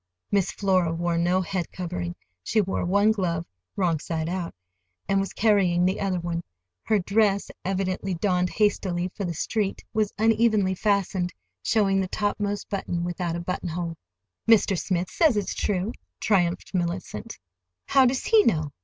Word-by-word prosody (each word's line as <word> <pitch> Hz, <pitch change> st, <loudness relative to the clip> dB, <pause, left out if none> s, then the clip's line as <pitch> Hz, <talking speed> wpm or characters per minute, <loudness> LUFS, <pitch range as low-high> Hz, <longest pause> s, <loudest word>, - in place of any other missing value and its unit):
Miss 200 Hz, -3 st, +2 dB
Flora 185 Hz, -4 st, +1 dB
wore 170 Hz, 0 st, 0 dB
no 180 Hz, +2 st, +2 dB
head 180 Hz, -1 st, -3 dB
covering. 90 Hz, -, -4 dB, 0.3 s
She 220 Hz, -, +1 dB
wore 195 Hz, -2 st, 0 dB
one 200 Hz, +4 st, +4 dB
glove 170 Hz, -6 st, -1 dB, 0.3 s
(wrong 170 Hz, -5 st, +1 dB
side 160 Hz, 0 st, -3 dB
out), 180 Hz, -1 st, -3 dB, 0.5 s
and 195 Hz, -, +2 dB
was 195 Hz, -, -2 dB
carrying 190 Hz, -5 st, +3 dB
the 190 Hz, +1 st, +1 dB
other 190 Hz, -2 st, 0 dB
one. 170 Hz, 0 st, -3 dB, 0.4 s
Her 215 Hz, -, +2 dB
dress, 200 Hz, +1 st, +1 dB
evidently 190 Hz, 0 st, -1 dB
donned 180 Hz, 0 st, +1 dB
hastily 185 Hz, -4 st, 0 dB
for 200 Hz, -, -4 dB
the 170 Hz, -2 st, -3 dB
street, 205 Hz, +4 st, -1 dB
was 215 Hz, -2 st, +1 dB
unevenly 220 Hz, -3 st, +3 dB
fastened, 190 Hz, -2 st, 0 dB, 0.3 s
showing 195 Hz, -, +2 dB
the 190 Hz, -, -1 dB
topmost 205 Hz, +1 st, -2 dB
button 180 Hz, -3 st, -2 dB
without 175 Hz, -1 st, -2 dB
a -, -, -3 dB
buttonhole. 170 Hz, -1 st, -3 dB, 0.5 s
"Mr. 215 Hz, -3 st, +5 dB
Smith 180 Hz, 0 st, -1 dB
says 310 Hz, -10 st, +3 dB
it's 205 Hz, -, -1 dB
true," 200 Hz, +1 st, -1 dB, 0.3 s
triumphed 180 Hz, -4 st, +1 dB
Mellicent. 180 Hz, +5 st, -3 dB, 0.5 s
"How 270 Hz, -2 st, +5 dB
does 255 Hz, +1 st, -1 dB
he 445 Hz, -2 st, +6 dB
know? 155 Hz, -, +1 dB
190 Hz, 155 wpm, -25 LUFS, 175-205 Hz, 0.5 s, he